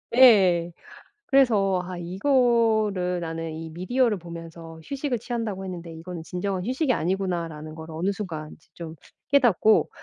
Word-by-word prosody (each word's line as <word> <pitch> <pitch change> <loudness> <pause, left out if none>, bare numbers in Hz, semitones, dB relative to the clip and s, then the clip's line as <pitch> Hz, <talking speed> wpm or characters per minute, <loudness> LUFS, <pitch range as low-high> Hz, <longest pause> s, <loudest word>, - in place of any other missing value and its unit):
예. 190 -9 +6 0.6
그래서 210 -9 +3
'아 180 0 -6
이거를 215 -2 +1
나는 165 -1 -4
이 160 +1 -7
미디어를 210 +7 0
보면서 165 -1 -10
휴식을 275 - -3
취한다고 220 -5 -4
했는데 175 -3 -7
이거는 165 +1 -8
진정한 180 +2 -3
휴식이 260 +4 0
아니구나.'라는 170 -6 -2
거를 160 0 -9
어느 175 +5 -1
순간 165 -7 -6
이제 155 - -21
좀 165 -1 -8 0.4
깨닫고 235 -6 +4
185 Hz, 330 characters per minute, -25 LUFS, 165-225 Hz, 0.6 s, 예